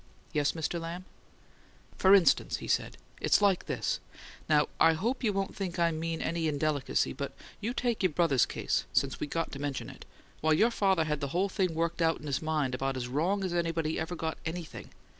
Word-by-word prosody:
"Yes, 145 Hz, -1 st, +2 dB
Mr. 165 Hz, +1 st, -2 dB
Lamb." 170 Hz, +3 st, -6 dB, 0.9 s
"For 190 Hz, +1 st, +6 dB
instance," 190 Hz, -4 st, +3 dB
he -, -, -8 dB
said, -, -, 0 dB, 0.2 s
"it's -, -, +4 dB
like 200 Hz, -3 st, +2 dB
this. -, -, -1 dB, 0.5 s
Now, 150 Hz, -1 st, +4 dB
I 165 Hz, -, +6 dB
hope 235 Hz, +11 st, -2 dB
you 220 Hz, -, +3 dB
won't 195 Hz, -1 st, -2 dB
think 185 Hz, -3 st, -4 dB
I 170 Hz, -1 st, +3 dB
mean 165 Hz, +1 st, -3 dB
any 165 Hz, -1 st, -1 dB
indelicacy, 150 Hz, -1 st, 0 dB
but -, -, -5 dB, 0.3 s
you 225 Hz, -, -2 dB
take 240 Hz, -2 st, 0 dB
your 185 Hz, -3 st, +3 dB
brother's 145 Hz, -6 st, +3 dB
case, -, -, -1 dB
since -, -, +1 dB
we -, -, -2 dB
got 165 Hz, +2 st, -2 dB
to 135 Hz, -, -6 dB
mention 140 Hz, -2 st, -3 dB
it, -, -, -13 dB, 0.3 s
why, 155 Hz, 0 st, +3 dB
your 225 Hz, +10 st, +4 dB
father 190 Hz, -6 st, +2 dB
had 150 Hz, -2 st, -1 dB
the 140 Hz, -, -2 dB
whole 195 Hz, +2 st, +2 dB
thing 185 Hz, -4 st, 0 dB
worked 170 Hz, +1 st, -1 dB
out 165 Hz, 0 st, +2 dB
in 150 Hz, -, -11 dB
his 140 Hz, -2 st, -1 dB
mind 155 Hz, -5 st, 0 dB
about 135 Hz, +1 st, -1 dB
as 120 Hz, -1 st, -3 dB
wrong 170 Hz, +10 st, 0 dB
as 185 Hz, -2 st, -2 dB
anybody 165 Hz, -2 st, 0 dB
ever 160 Hz, +2 st, -3 dB
got 160 Hz, -1 st, -3 dB
anything. 165 Hz, 0 st, -6 dB
165 Hz, 205 wpm, -30 LUFS, 155-185 Hz, 0.9 s, For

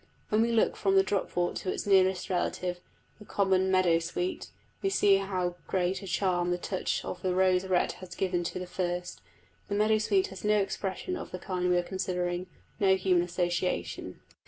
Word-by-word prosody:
When 215 Hz, +1 st, +3 dB
we 235 Hz, +1 st, +2 dB
look 230 Hz, -1 st, +2 dB
from 195 Hz, -1 st, +1 dB
the 195 Hz, -, +6 dB
dropwort 185 Hz, -3 st, -1 dB
to 185 Hz, -, -2 dB
its -, -, -4 dB
nearest 190 Hz, -2 st, +3 dB
relative, 180 Hz, 0 st, -1 dB, 0.4 s
the 210 Hz, -, -12 dB
common 190 Hz, -2 st, +2 dB
meadow 185 Hz, -3 st, +4 dB
sweet, 175 Hz, +2 st, -3 dB, 0.3 s
we 390 Hz, -, +1 dB
see 200 Hz, -, +4 dB
how 185 Hz, -3 st, -2 dB
great 185 Hz, +1 st, 0 dB
a 195 Hz, -, -8 dB
charm 180 Hz, -1 st, +1 dB
the 175 Hz, -, +1 dB
touch 185 Hz, +1 st, -2 dB
of 180 Hz, -, -6 dB
rose 185 Hz, 0 st, +2 dB
red 185 Hz, -1 st, +2 dB
has 180 Hz, -2 st, -9 dB
given 180 Hz, -2 st, 0 dB
to -, -, -3 dB
the 180 Hz, -, -4 dB
first: 180 Hz, 0 st, -3 dB, 0.5 s
the 205 Hz, -, -2 dB
meadow 215 Hz, +1 st, +3 dB
sweet 200 Hz, -3 st, +2 dB
has 190 Hz, -1 st, -10 dB
no 210 Hz, 0 st, +3 dB
expression 195 Hz, -, -2 dB
of -, -, -6 dB
the 180 Hz, -, -5 dB
kind 180 Hz, 0 st, -2 dB
we 180 Hz, -, +4 dB
are 175 Hz, -, +1 dB
considering 180 Hz, -1 st, -2 dB, 0.3 s
no 190 Hz, -1 st, +5 dB
human 185 Hz, -2 st, +2 dB
association. 175 Hz, -, -2 dB
185 Hz, 185 wpm, -29 LUFS, 180-195 Hz, 0.5 s, the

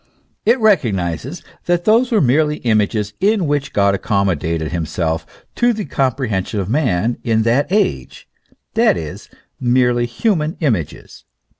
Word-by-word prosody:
It 240 Hz, +3 st, +4 dB
recognises 120 Hz, -, 0 dB, 0.2 s
that 175 Hz, 0 st, +1 dB
those 235 Hz, +4 st, +3 dB
were 220 Hz, -, +3 dB
merely 150 Hz, +3 st, +2 dB
images 105 Hz, -2 st, +1 dB
in 205 Hz, -1 st, +2 dB
which 145 Hz, -1 st, -1 dB
God 100 Hz, -1 st, +2 dB
accommodated 85 Hz, -6 st, -1 dB
himself 80 Hz, -1 st, -2 dB, 0.3 s
to 240 Hz, 0 st, +2 dB
the 215 Hz, -2 st, -4 dB
com 135 Hz, -3 st, 0 dB
prehension 110 Hz, -6 st, -2 dB
of 95 Hz, -, -3 dB
men 120 Hz, -, 0 dB
in 110 Hz, -1 st, +1 dB
that 130 Hz, +8 st, +1 dB
age, 70 Hz, -, -1 dB, 0.5 s
that -, -, +3 dB
is, 80 Hz, -3 st, -7 dB, 0.3 s
merely 125 Hz, -1 st, +2 dB
human 160 Hz, -, -1 dB
images. 110 Hz, -, -3 dB
120 Hz, 135 wpm, -18 LUFS, 95-160 Hz, 0.5 s, It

